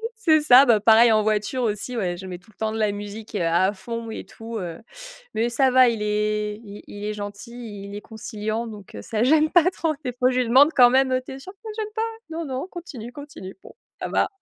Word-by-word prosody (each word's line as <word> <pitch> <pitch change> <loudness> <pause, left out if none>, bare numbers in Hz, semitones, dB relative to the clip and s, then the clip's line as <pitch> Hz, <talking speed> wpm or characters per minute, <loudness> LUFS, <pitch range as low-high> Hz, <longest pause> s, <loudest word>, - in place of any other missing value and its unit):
c'est 315 -8 +3
ça, 270 -2 +7
bah 225 -3 +4
pareil 225 +1 +6
en 215 - +4
voiture 215 +4 0
aussi 230 +3 -2
ouais. 180 -4 -1
Je 190 +1 -9
mets 180 -1 -6
tout 180 +5 -23
le - - -43
temps 220 0 -2
de - - -3
la 215 -2 +1
musique, 205 +2 -8
heu, 190 - -1
à 175 +4 +2
fond 230 +3 -6
et - - -7
tout 225 0 -8
heu, 175 -2 -6 0.5
mais 230 +2 0
ça 260 +2 +2
va, 255 -1 +6
il 225 -3 -1
est 210 0 -1
il 205 0 -10
il 205 0 -8
est 210 - -2
gentil, 205 0 -8
il 200 +1 -8
est 205 - -6
conciliant, 220 +1 -5
donc 210 -3 -11
heu, 100 - -7
ça 220 - -1
gêne 310 +3 +4
pas 355 +1 +4
trop. 320 -3 -1
Des 250 - -2
fois 250 +1 +1
je 255 - 0
lui 240 - -2
demande 280 +6 +6
quand 245 -1 +8
même, 260 0 +3
heu: 255 - +1
«Tu - - -9
es 270 - -9
sûr 375 +8 -11
que 395 - -43
ça 440 - -7
gêne 425 0 -5
pas?», 445 - -1 0.3
«Non, 335 +1 -3
non, 265 +5 -4
continue, 265 -10 -8
continue», 285 -10 -10
«Bon, - - -13 0.3
ça - - -3
va». - - +2
225 Hz, 260 wpm, -23 LUFS, 210-260 Hz, 0.5 s, quand